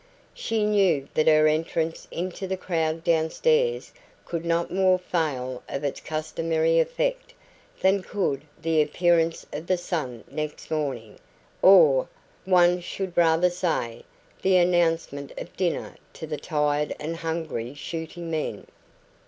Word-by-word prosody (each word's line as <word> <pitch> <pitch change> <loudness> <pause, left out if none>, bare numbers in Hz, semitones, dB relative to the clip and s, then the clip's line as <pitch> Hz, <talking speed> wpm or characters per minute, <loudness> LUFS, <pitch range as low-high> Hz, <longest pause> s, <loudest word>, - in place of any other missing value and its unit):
She 225 -2 -1
knew 190 -9 +2
that 155 - +1
her 155 -1 +6
entrance 160 +1 -1
into 185 +2 -4
the 190 0 -2
crowd 165 -3 -1
downstairs 465 - +1 0.3
could 170 -1 -4
no 170 0 +1
more 185 0 +3
fail 140 -8 -2
of 140 - -4
its 140 - -2
customary 160 +1 0
effect - - -1 0.5
than 190 +1 +3
could 185 -9 -2 0.2
the 160 -1 +2
appearance 165 +1 +1
of 155 +3 -6
the 185 - +2
sun 150 -9 -4
next 150 +1 -6
morning 135 -9 -3 0.4
or, 160 -9 +6 0.4
one 180 -1 +4
should 185 0 -5
rather 170 +1 +4
say, 165 -10 -2 0.4
the 190 -1 +4
announcement 165 -5 +1
of - - -8
dinner 180 -3 -2 0.2
to - - -7
the 150 -1 -4
tired 150 -1 0
and 160 +2 -4
hungry 160 -7 -4
shooting 165 +2 -6
men. 155 -1 -3
165 Hz, 130 wpm, -25 LUFS, 155-180 Hz, 0.5 s, her